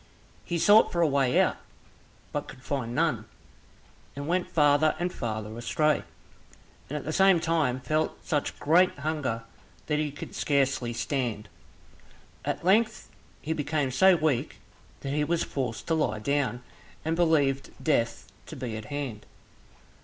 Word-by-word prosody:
He 170 - -2
sought 205 +6 +6
for 170 - 0
a 165 - +5
way 135 -3 +2
out, - - +2 0.7
but - - -3
could 125 - -12
find 125 -5 -3
none, 155 -9 +1 0.9
and 140 +1 -5
went 180 +2 0
farther 150 0 +4
and 175 +2 -2
farther 110 -2 -4
astray, 150 +6 +1 0.9
and 150 - -3
at - - -5
the 155 - -2
same 190 -1 +5
time 160 -6 0
felt 155 +3 -1
such 150 -5 -1
great 175 +4 +4
hunger 145 -6 -2 0.4
that 150 -1 0
he 150 -1 0
could 145 - -9
scarcely 135 -4 +1
stand. 120 -4 -2 0.9
At - - -3
length 215 +2 +2 0.3
he 160 - -1
became 145 -3 -1
so 190 +8 +6
weak 155 -6 0 0.5
that 135 0 -3
he 150 0 +1
was 165 +3 0
forced 125 -5 -4
to 165 - 0
lie 150 -9 +1
down, 125 +1 -1 0.4
and 160 - +1
he 175 +1 +3
believed 140 -5 +2
death 115 -7 0 0.2
to - - -8
be 125 -5 -5
at 110 - -7
hand. 130 -5 -5
145 Hz, 155 wpm, -27 LUFS, 125-160 Hz, 0.9 s, sought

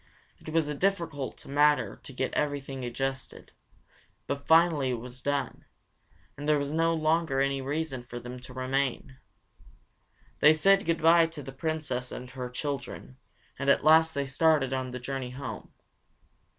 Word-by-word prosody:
It - - -10
was 160 -1 +1
a 150 - -2
difficult 165 -5 -2
matter 145 +1 +2
to - - -11
get 130 0 -3
everything 140 -3 -2
adjusted, 135 +2 -4 0.7
but 140 0 -4
finally 160 -4 +4
it 125 - 0
was 125 +2 -9
done, 140 -1 -2 0.7
and 145 +1 -4
there 150 - +5
was 140 +1 -2
no 165 +1 +2
longer 155 -3 +1
any 135 0 +1
reason 140 -1 -3
for 120 0 -8
them 125 +1 -8
to 130 +1 -12
remain. 130 0 -2 1.2
They 150 +1 +7
said 195 +4 +4
good 165 -1 0
bye 165 0 +6
to 165 -3 -8
the 135 - -8
Princess 135 -3 -3
and 125 0 -8
her 125 -1 -5
children, 125 - -5 0.4
and 140 0 0
at - - +4
last 160 0 +5
started 135 -1 +2
on 130 -1 -2
the 125 - -5
journey 130 0 -4
home. 130 +1 -7
140 Hz, 155 wpm, -28 LUFS, 130-155 Hz, 1.2 s, They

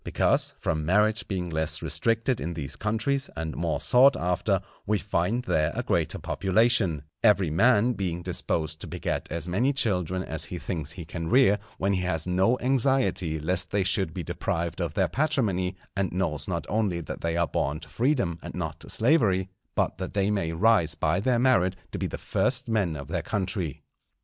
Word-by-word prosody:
Because, - - +1
from 80 -1 -1
marriage 105 +6 +2
being 90 -4 -3
less 80 +1 0
restricted 115 - 0
in 85 +1 -3
these 70 -4 -3
countries, 115 +6 -1
and 80 -1 -4
more 85 -2 -1
sought 135 +2 +5
after, 90 +2 0 0.3
we 105 +1 +2
find 100 +5 -1
there 75 -10 +1
a - - -2
greater - - 0
population; 95 - +2 0.2
every 100 -7 +4
man 115 +6 +4
being 90 -5 -3
disposed 80 -2 -1
to - - -6
beget - - -3
as 85 0 -4
many 110 +10 +1
children 95 - 0
as 80 -3 -2
he 90 - -6
thinks 80 -4 -4
he 85 - -8
can 80 0 -5
rear, 120 -6 +5 0.2
when 100 +1 +1
he 90 - 0
has 80 -3 -1
no 95 +7 +2
anxiety 130 - +1
lest 90 +4 0
they 100 -1 +1
should 95 -2 +1
be 90 +2 -5
deprived 85 0 -3
of - - -3
their - - +2
patrimony, 110 - 0 0.2
and 100 -2 0
knows 80 -6 -2
not 85 -4 -2
only 105 -5 0
that 85 - -7
they 85 0 -1
are 85 - +3
born 75 -1 -2
to - - -10
freedom 120 - 0
and - - -8
not 80 -3 -4
to - - -8
slavery, 110 - +2 0.3
but - - 0
that 95 +1 -5
they 100 0 +2
may 95 -6 -1
rise 85 -2 +3
by 80 +3 +1
their 120 +4 +2
merit 115 -8 +3 0.2
to - - -4
be - - -1
the - - -6
first - - 0
men 100 -8 0
of 70 -2 -7
their - - -2
country. 95 - -3
95 Hz, 190 wpm, -26 LUFS, 85-110 Hz, 0.3 s, sought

